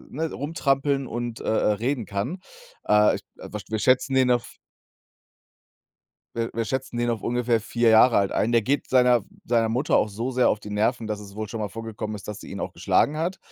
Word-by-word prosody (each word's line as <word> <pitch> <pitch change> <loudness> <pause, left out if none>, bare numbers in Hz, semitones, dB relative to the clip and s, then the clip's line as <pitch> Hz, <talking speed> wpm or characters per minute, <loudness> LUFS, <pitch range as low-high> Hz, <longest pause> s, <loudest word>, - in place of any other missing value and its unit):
ne, 160 +3 -3
rumtrampeln 140 -2 0
und, 120 -1 -5
äh - - -8
äh, 110 -1 +2
reden 120 +4 -1
kann. 100 - -3 0.5
Äh, 105 0 +5
ich - - -10
wa 105 - -8
wir 110 0 -2
schätzen 130 +3 +2
den 130 -1 +4
auf 120 -1 -1 1.8
wir 115 0 -2
wir 115 0 -2
schätzen 130 0 -3
ihn 120 - 0
auf 115 -2 -3
ungefähr 120 -1 +1
4 120 +1 +1
Jahre 115 +2 +6
alt 100 -1 +1
ein. 115 - +1
Der 115 -2 +4
geht 140 +5 -1
seiner 125 -2 +4 0.2
seiner 115 -1 +2
Mutter 125 +6 +1
auch - - +2
so 115 +6 -3
sehr 125 -1 +3
auf 105 - -1
die 105 - -9
Nerven, 110 +2 0
dass 105 -1 -3
es 100 -1 -11
wohl 110 -1 -5
schon 115 0 -5
mal 105 - -2
vorgekommen 110 -1 -6
ist, 100 - -11
dass 105 0 -6
sie - - -11
ihn 100 - -6
auch - - -4
geschlagen 150 - +1
hat, 170 +4 -2
115 Hz, 215 wpm, -25 LUFS, 110-130 Hz, 1.8 s, Jahre